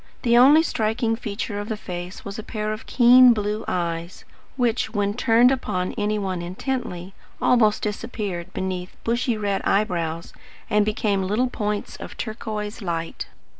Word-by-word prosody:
The 235 -2 +3
only 280 +6 +7
striking 225 -4 0
feature 215 -1 -4
of 205 +2 -6
the 220 - -2
face 180 -2 -7
was 200 +2 -6
a - - -5
pair 215 -2 -3
of 215 - -9
keen 250 0 +7
blue 210 0 -2
eyes, 170 0 -3 0.3
which, 240 -3 0
when 205 0 +1
turned 240 +1 +4
upon 185 -8 -2
any 210 0 0
one 190 -3 -2
intently, 185 -1 -4 0.3
almost 220 -4 +3
disappeared 205 -4 -4
beneath 185 -1 -4
bushy 235 0 0
red 200 -2 -1
eyebrows 170 -5 -1 0.4
and 210 -1 +4
became 210 -2 0
little 215 +7 0
points 210 -3 -3
of - - -9
turquoise 215 -1 -5
light. 165 -3 -4
210 Hz, 150 wpm, -23 LUFS, 190-230 Hz, 0.4 s, only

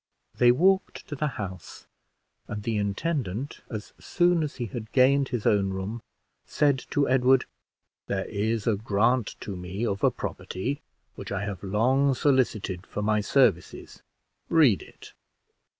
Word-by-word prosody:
They 120 -1 +5
walked 190 +9 +1
to 145 - -4
the 150 +2 -1
house, 95 -5 -7 0.6
and 105 0 -5
the 115 0 -1
intendant, 105 - -2
as 110 -2 -7
soon 175 -2 +2
as 150 -2 -3
he 120 - -3
had 110 +1 -7
gained 135 +1 +4
his 120 -4 -3
own 100 -2 +3
room, 95 +4 -4 0.5
said 140 -3 +2
to 145 -1 +1
Edward 130 0 +4 0.6
"There 95 -1 -2
is 110 +1 -2
a 115 - +2
grant 110 +3 +1
to 100 - -5
me 90 +5 -4
of 100 -3 -2
a - - +6
property 130 +10 -4 0.3
which - - -9
I 100 0 -2
have 100 -4 -5
long 130 +8 +2
solicited 115 -10 0
for 105 - -4
my 105 0 +2
services 105 -7 +1 0.5
read 145 - +4
it." - - -14
115 Hz, 150 wpm, -26 LUFS, 100-135 Hz, 0.6 s, a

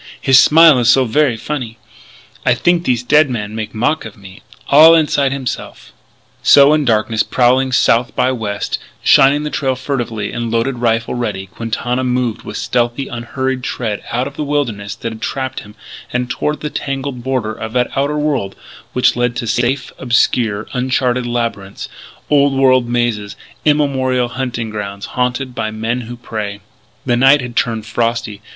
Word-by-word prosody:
His 135 -1 +5
smile 160 -3 +6
is 120 -1 +2
so 130 +1 +5
ver' 125 +1 +1
funny.... 120 -3 -5 0.7
I 120 - +3
think 175 +4 +1
thees 125 -1 +1
dead 150 +1 +4
man 105 -4 -4
make 110 0 -5
mock 125 +8 0
of 110 -2 -10
me 95 -1 -14 0.3
all 160 +3 +8
inside 145 -4 +2
himse'f 135 -2 -6 0.2
" - - -37
So, 140 +1 +6
in 155 -2 +1
darkness, 110 -1 +1
prowling 130 +1 +2
south 120 -1 +2
by 130 - +2
west, 105 -5 -3 0.2
shining 140 +2 +5
the 150 - -4
trail 130 -2 -1
furtively, 120 -6 -3
and 120 -1 -3
loaded 115 +3 -1
rifle 115 -1 0
ready, 120 -6 -3
Quintana 115 +5 -3
moved 125 -3 -1
with - - -7
stealthy, 120 +2 -1
unhurried 130 +2 -3
tread 110 -5 -3
out 125 +2 0
of 140 +1 -8
the - - -2
wilderness 120 -9 -2
that 115 - -5
had 110 0 -10
trapped 130 +1 -3
him 105 0 -14 0.4
and 125 0 -2
toward 150 +4 -2
the 150 - -4
tangled 135 -2 -4
border 125 -4 -2
of 110 0 -7
that 125 -1 0
outer 140 +2 0
world 145 -10 -1 0.4
which 125 - +2
led 120 0 0
to - - -3
safe, 120 +4 -1
obscure, 115 -4 +1
uncharted 125 -1 0
labyrinths 115 -5 -3 0.4
old 145 -1 +3
world 130 -2 +3
mazes, 120 -4 -1 0.3
immemorial 130 -5 +1
hunting 120 -3 -4
grounds 100 -2 -5
haunted 125 +1 -1
by 110 - -3
men 110 +3 -3
who 120 +1 -8
prey. 105 -4 -6 0.4
The 120 - +1
night 135 +3 +5
had 125 -1 -7
turned 115 -3 -1
frosty. 115 -2 -2
125 Hz, 170 wpm, -16 LUFS, 115-135 Hz, 0.7 s, all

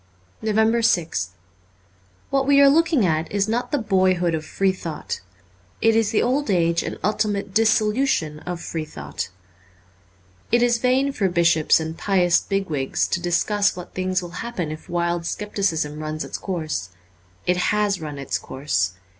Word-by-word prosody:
345 215 -1 -2
NOVEMBER 220 -6 +3
6th 90 -2 -2 1.0
WHAT 275 -1 +1
we 280 0 +6
are 280 0 +8
looking 315 - +3
at 160 -1 0
is 200 0 +1
not 235 +3 -1
the 295 - +2
boyhood 185 -6 +2
of 155 -1 -2
free 195 +4 +1
thought: 165 -5 -5 0.6
it 225 0 +3
is 225 -2 +3
the 220 - +2
old 270 +3 0
age 170 -3 +2
and - - -5
ultimate 205 -1 -1
dissolution 215 - +2
of 180 +1 -5
free 165 -1 -4
thought. 75 - -6 1.2
It 240 +1 +4
is 240 -1 +3
vain 260 +3 +2
for 200 -7 0
bishops 170 -3 +3
and 160 0 -4
pious 180 -4 +3
big 195 -1 -2
wigs 135 -4 -1
to 175 - -1
discuss 200 +4 +1
what 180 -1 -9
things 185 0 -1
will 175 - -7
happen 190 -10 -4
if 155 - -9
wild 170 0 -1
scepticism 165 -8 -2
runs 155 0 -4
its - - -6
course. 155 - -3 0.6
It 180 - +2
has 205 0 +1
run 150 -2 -6
its 140 -1 -2
course. 95 - -1
185 Hz, 165 wpm, -23 LUFS, 160-220 Hz, 1.2 s, are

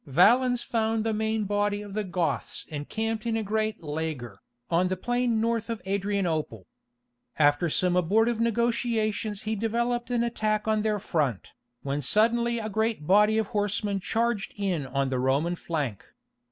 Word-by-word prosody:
Valens 240 - +4
found 225 -1 0
the 225 0 0
main 220 0 0
body 205 0 0
of 205 -1 -9
the 215 +1 -1
Goths 180 -3 -2
encamped 220 +10 -3
in 225 -1 +1
a 220 - -1
great 215 -1 -1
"laager," 150 -9 -4 0.3
on 175 +2 +3
the 185 0 -2
plain 245 +2 0
north 230 0 0
of 230 -2 -2
Adrianople. 185 - -1 0.7
After 145 +3 +3
some 180 +3 +2
abortive 220 +6 +2
negotiations 230 -2 0
he 220 0 -1
developed 235 +3 -1
an 240 -1 +1
attack 215 -2 -1
on 215 -1 +2
their 215 -1 +1
front, 145 - -1 0.3
when 140 +1 -2
suddenly 235 - +2
a 220 -2 -3
great 220 -5 -1
body 210 +5 +5
of 220 -2 0
horsemen 205 -2 -1
charged 225 +1 -1
in 180 -9 -1
on 135 +1 -1
the 130 -1 -1
Roman 140 +7 +1
flank. 145 - -3
210 Hz, 155 wpm, -27 LUFS, 170-225 Hz, 0.7 s, body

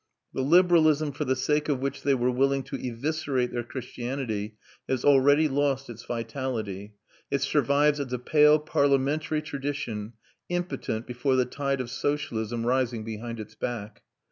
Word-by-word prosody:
The - - -1
liberalism 155 -1 +4
for 150 +2 -3
the 130 0 +1
sake 150 +4 0
of 140 -3 +1
which 140 +1 -3
they 140 -1 +2
were 125 0 +1
willing 135 +2 +1
to 135 +1 -6
eviscerate 130 +1 -2
their 120 - -2
Christianity 120 -3 -4 0.3
has 130 -2 -1
already 145 +2 +5
lost 135 -2 0
its 115 0 -10
vitality; 115 -4 -4 0.3
it 140 -1 0
survives 145 +2 +3
as 135 -3 -4
a 125 - 0
pale 150 +4 +5
parliamentary 150 +1 +1
tradition, 135 -7 -4 0.4
impotent 145 -10 -2
before 125 +2 0
the 130 -1 +3
tide 140 +1 -2
of 120 -1 -6
socialism 115 -5 -2
rising 125 -2 +1
behind 115 +1 -6
its 110 - -8
back. 110 -4 -5
135 Hz, 150 wpm, -27 LUFS, 120-145 Hz, 0.4 s, already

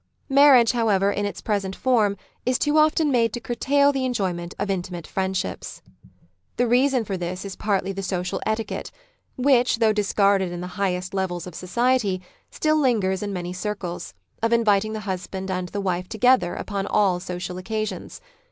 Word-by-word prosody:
Marriage, 270 -4 +7
however, 205 -5 +2
in 205 0 -1
its 205 - -7
present 195 -3 -1
form 220 -6 +2 0.3
is 250 +1 +1
too 295 +1 +2
often 310 -1 +3
made 230 -3 +3
to - - -3
curtail 280 +4 +2
the 270 -2 -2
enjoyment 185 -9 -2
of - - -2
intimate 175 -3 -4
friendships. 190 - -3 0.7
The 245 - +3
reason 250 0 +3
for 195 - -4
Society 175 -2 -2
97 - - -2
this 185 +2 -6
is 195 - -6
partly 195 -2 -1
the 195 0 -5
social 180 -1 -2
etiquette, 220 +1 -3 0.5
Vv'hich, 250 -2 +3
though 225 -1 +3
dis 210 -2 -1
carded 195 -3 +3
in 175 - -5
the 180 +2 -7
highest 180 -1 -1
levels 185 -3 -2
of 180 - -9
society, 215 +1 +1 0.3
still 310 0 +1
lingers 215 -10 +1
in 205 -1 -3
many 180 -2 -4
circles, 180 -2 -5 0.3
of 230 0 +1
inviting 215 -2 +3
the 215 - -4
husband 190 -1 -4
and 180 -1 -3
the 205 - -4
wife 180 -1 -2
together 245 -4 +3
upon 200 -1 -3
all 190 -4 +2
social 180 0 -5
occasions. 215 +3 -4
200 Hz, 180 wpm, -24 LUFS, 185-240 Hz, 0.7 s, Marriage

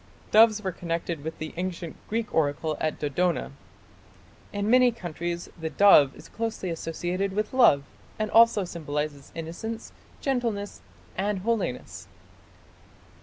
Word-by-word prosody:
Doves 215 0 +6
were 190 - -1
connected 170 -3 -3
with 160 +1 -5
the 155 - -6
ancient 175 -2 -4
Greek 225 0 -2
oracle 155 0 +1
at 155 - 0
Dodona. 150 - 0 1.0
In 205 0 -2
many 250 +1 +6
countries 175 -4 -5
the 160 0 -3
dove 155 -8 +6
is 150 - -13
closely 225 -5 -3
associated 175 +4 -2
with 215 +4 -2
love, 235 - +5 0.3
and 215 -1 -2
also 230 -3 +6
symbolizes 150 -4 -4
innocence, 170 +8 -6 0.3
gentleness, 235 -7 -2 0.3
and 200 +2 0
holiness. 220 - -2
180 Hz, 120 wpm, -26 LUFS, 160-215 Hz, 1.0 s, Doves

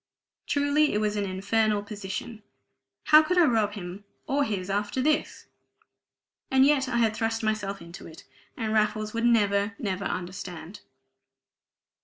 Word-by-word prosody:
Truly 285 +1 +2
it - - +1
was 210 -1 0
an 205 -1 -1
infernal 205 +2 0
position: 205 +2 -6 0.6
how 305 0 +7
could 360 +4 -1
I 350 - +6
rob 220 -6 +1
him 190 0 -8 0.2
or 285 +1 +1
his 195 -7 -3
after 205 +5 -2
this? 300 +3 0 1.0
And 265 0 +5
yet 275 -2 +2
I 240 - 0
had 225 -2 +2
thrust 225 0 -2
myself 205 -4 -2
into 170 +3 -11
it; 160 0 -13 0.3
and 220 -1 -2
Raffles 215 0 0
would 230 +1 -1
never, 205 -3 +2
never 195 -1 -3
understand! 180 0 -6
215 Hz, 145 wpm, -27 LUFS, 200-235 Hz, 1.0 s, how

